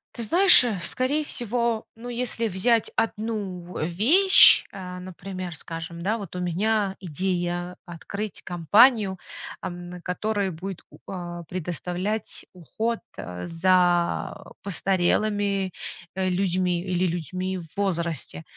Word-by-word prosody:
Ты 235 - -1
знаешь, 360 - +9
э, 215 -6 -2
скорее 270 - 0
всего, 235 -3 -1
ну, 240 +2 -9
если 235 -1 -1
взять 220 +4 +2
одну 215 -5 -2
в 155 - -2
вещь, 295 - +6
э, 180 -2 -8
например, 185 -1 -7
скажем, 165 +2 -6
да, 215 +5 0
вот 195 -4 -8
у - - -3
меня 195 +3 0
идея 175 0 -3
открыть 200 +4 -6
компанию, 195 - +3 0.4
ам, 175 0 -7
которая 200 +1 -1
будет 180 +3 -7
у - - -16
а, 175 -2 -6
предоставлять 180 +5 -4
уход 220 +6 -3 0.4
за 175 +2 +1 0.2
постарелыми, 195 +1 0 0.4
э, 190 -1 0
людьми 180 -1 0
или 185 -1 0
людьми 185 +2 -3
в 165 - -10
возрасте. 170 - -1
185 Hz, 115 wpm, -25 LUFS, 175-215 Hz, 0.4 s, знаешь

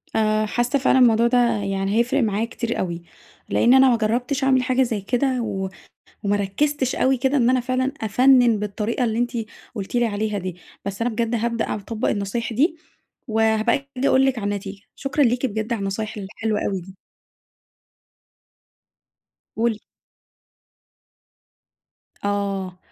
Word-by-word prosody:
آآ 215 0 +2
حاسة 240 +5 0
فعلًا 265 0 +3
الموضوع 235 -2 +5
ده 250 +1 +2 0.3
يعني 195 0 -1
هيفرِق 240 +4 +2
معايا 215 0 0
كتير 235 0 -4
أوي، 170 -2 -3 0.5
لإن 240 +2 +4
أنا 265 0 +7
ما 235 - +3
جرَّبتش 245 +5 -1
أعمَل 260 -1 +3
حاجة 255 0 +2
زي 225 -5 -2
كده 250 +4 0
و 190 -4 -3 0.5
وما 205 0 +1
ركزتش 260 +7 0
أوي 265 0 +2
كده 265 +3 +1
إن 245 -2 +3
أنا 255 0 +3
فعلًا 255 +2 -1
أفَنَّن 245 +1 +4
بالطريقة 210 +4 -2
اللي 225 -1 -1
أنتِ 240 0 0 0.4
قُلتِ 200 -1 -6
لي 240 -1 +3
عليها 210 0 -2
دي، 185 -2 -5 0.3
بس 200 +1 -5
أنا 240 - +1
بجد 230 +1 -1
هابدأ 230 0 -1
أع - - -1
أطبق 215 +2 -3
النصايح 210 +4 -2
دي 310 +8 +2 0.5
وهابقى 220 0 +2 0.2
أجي 265 +2 +1
أقول 265 +1 +4
لِك 265 -2 0
على 210 - -5
النتيجة، 200 0 -6
شكرًا 280 +1 0
ليكِ 245 +2 +1
بجد 220 -1 -3
على 230 - -2
النصايح 200 +3 -3
الحلوة 210 +2 -3
أوي 195 -2 -2
دي. 190 +2 -13 2.6
قولي. 225 -1 0 2.5
آه، 195 -2 -2
225 Hz, 150 wpm, -22 LUFS, 205-250 Hz, 2.6 s, أنا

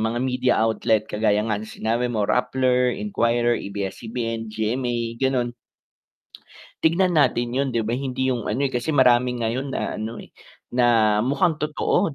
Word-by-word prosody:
mga 110 +2 -1
media 125 -1 +1
outlet 110 -1 +1
kagaya 105 -1 +1
nga 110 -2 0
ng 110 - -8
sinabi 115 +3 -1
mo 110 -4 0
Rappler, 125 0 +2
Inquirer, 120 - +1
ABS-CBN, 115 +3 -4
GMA, 120 +3 -1 0.2
gano'n. 125 -3 0 1.3
Tignan 175 +3 +2
natin 120 -4 +2
'yun 135 +1 0
'di 115 -2 +1
ba, 115 - -2
hindi 130 0 -1
'yung 120 -3 -4
ano 125 +7 0
eh, 135 - -1
kasi 125 +5 -1
marami 125 -1 +4
ngayon 125 +5 -1
na - - -3
ano 110 +2 -5
eh, - - -16 0.4
na 115 -4 +3
mukhang 145 +6 +1
totoo 150 0 0
120 Hz, 155 wpm, -23 LUFS, 110-130 Hz, 1.3 s, marami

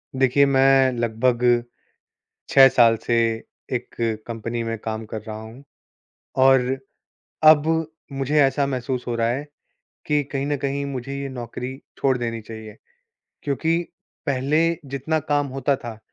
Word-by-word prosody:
देखिए, 135 +2 +4
मैं 135 -1 +4
लगभग 120 +1 +2 0.9
6 135 -1 +8
साल 115 -3 +5
से 120 - +1 0.6
एक 125 -1 -4 0.3
कंपनी 115 0 -4
में 115 0 -3
काम 110 0 -4
कर 110 0 -6
रहा 110 0 -7
हूँ। 115 +5 -12 0.8
और 135 0 +6 0.8
अब 155 -1 +7 0.4
मुझे 140 +2 0
ऐसा 140 +1 +2
महसूस 130 -1 -3
हो 120 - -1
रहा 115 0 +1
है, 135 +5 -2 0.6
कि 150 -1 +1
कहीं 135 -1 -2
न 145 - 0
कहीं 140 0 -2
मुझे 135 -1 -5
ये 140 - -4
नौकरी 125 +1 -6 0.2
छोड़ 130 -2 +2
देनी 115 -1 -3
चाहिए। 110 0 -10 0.7
क्योंकि 150 +4 0 0.5
पहले 140 +2 +1 0.3
जितना 140 +4 -2
काम 145 -1 +2
होता 135 +1 0
था, 120 -4 -8
130 Hz, 140 wpm, -23 LUFS, 120-140 Hz, 0.9 s, 6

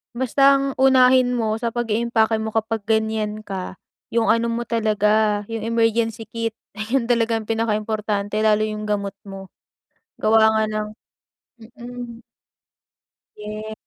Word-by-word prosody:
Basta 260 +2 -1
ang 275 0 +1
unahin 255 -1 +5
mo 220 -2 -1
sa 230 0 -3
pag-iimpake 230 -1 +1
mo 220 0 -4
kapag 225 -1 -2
ganiyan 220 -1 -1
ka, 190 -3 -6 0.4
'yung 230 -1 +2
ano 230 +1 +3
mo 235 0 -2
talaga 215 -2 +1
'yung 225 -1 -4
emergency 225 0 0
kit, 230 -1 -3 0.2
iyun 230 +3 -1
talaga 230 -1 +2
ang 225 -1 -3
pinakaimportante 215 -2 -1
lalo 215 0 +3
'yung 215 0 -3
gamot 200 -1 -2
mo. 195 -1 -9 0.7
Gawa 220 0 +4
nga 220 0 +2
ng 215 0 -3 0.7
mm. 240 0 -10 1.1
Ye 215 +1 -7
220 Hz, 130 wpm, -21 LUFS, 215-230 Hz, 1.1 s, unahin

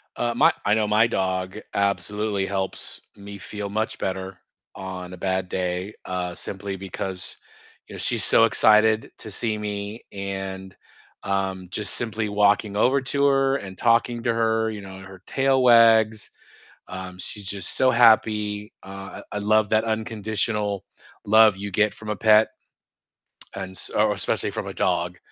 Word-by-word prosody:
Uh, 120 0 -1
my 160 +6 +5
I 105 - +3
know 110 -1 +2
my 110 +2 +4
dog 95 -1 -2
absolutely 100 0 -1
helps 95 -1 -3 0.2
me 100 0 -10
feel 105 0 -6
much 110 +2 -2
better 95 0 -4 0.4
on 90 -1 -7
a - - -8
bad 95 0 -1
day, 90 +2 -2
uh, 90 -1 -3
simply 95 0 -4
because, 95 -1 -3 0.5
you - - -12
know, - - -7
she's - - 0
so - - +5
excited 110 +1 +3
to 110 - -8
see 110 +2 0
me, 105 +1 -5
and, 95 -1 -5 0.5
um, 95 -2 -2
just 105 +2 -1
simply 110 -2 -2
walking 105 0 +2
over 130 +5 +3
to 140 +2 0
her 135 -1 +3
and 95 -4 -9
talking 115 0 +2
to 115 - +1
her, 110 -1 +1
you 105 -2 -7
know, 95 -1 -10
her 95 -1 -12
tail 135 -1 +2
wags, 115 -3 +5 0.6
um, 90 0 -7
she's 100 +1 -6
just 95 -1 -3
so 130 - +4
happy, 105 -3 +3
uh, 95 0 -9
I - - -7
I - - -1
love 105 0 +2
that 110 0 +3
unconditional 110 -2 -2 0.4
love 110 -1 +6
you 100 +1 -6
get 105 +2 +2
from 110 -1 -10
a 105 - -1
pet 110 +1 +5 1.1
and 95 -1 -5
s 95 - -3
or 105 0 +2
especially - - -1
from - - -5
a - - -5
dog, 85 +1 -1
105 Hz, 160 wpm, -24 LUFS, 95-110 Hz, 1.1 s, love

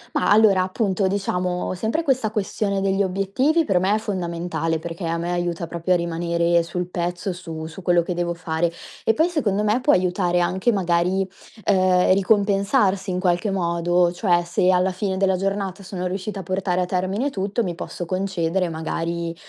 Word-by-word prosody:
Ma, - - +2
allora, 205 -2 +5
appunto 190 +1 0
diciamo 180 -2 -1
sempre 220 - -1
questa 260 -7 +1
questione 200 -1 -1
degli 195 0 +1
obiettivi 200 - +1
per 185 -6 +2
me 195 +3 +2
è - - +2
fondamentale, 170 -5 -2
perché 165 +2 -5
a 165 0 -1
me 170 +1 -3
aiuta 175 -1 -2
proprio 170 +2 0
a - - +3
rimanere 170 0 +1
sul 175 +1 -4
pezzo, 175 +1 -3
su 165 -3 -7
su 160 +4 -9
quello 175 -1 +3
che 180 - -3
devo 175 0 -2
fare 165 0 -1 0.3
e 225 - +2
poi 320 +6 +3
secondo 210 - 0
me 215 +4 +1
può 290 - +3
aiutare 180 -1 +2
anche 185 +6 +1
magari, 185 -1 +1 0.4
uhm, 185 -2 +4
ricompensarsi 200 0 +2
in 180 0 -1
qualche 180 +3 +1
modo. 175 -1 +1
Cioè 175 -1 +1
se 175 +1 +1
alla 185 +1 +3
fine 190 0 -2
della 190 -1 +2
giornata 195 0 -2
sono 185 -1 -5
riuscita 195 +2 -4
a - - -10
portare 185 0 -1
a - - +1
termine 190 +9 -1
tutto, 200 +3 -1
mi 180 -4 -2
posso 175 0 -6
concedere 185 -1 -1
magari, 165 +1 -3
185 Hz, 180 wpm, -22 LUFS, 175-195 Hz, 0.4 s, allora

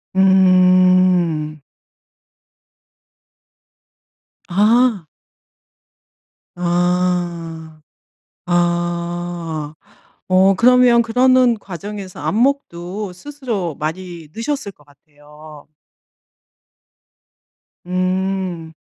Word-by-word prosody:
음. 185 -4 +3 2.9
아. 210 0 +2 1.5
아. 175 -2 -2 0.7
아. 175 -2 -2 0.5
어 190 +1 +4
그러면 245 +2 +5
그러는 250 +1 +3
과정에서 195 -1 -8
안목도 200 - -2
스스로 220 - -5
많이 165 +1 -6
느셨을 230 -3 -4
것 145 - -25
같아요. 150 +1 -17 2.2
음. 185 -2 -2
180 Hz, 100 characters per minute, -18 LUFS, 170-200 Hz, 2.9 s, 그러면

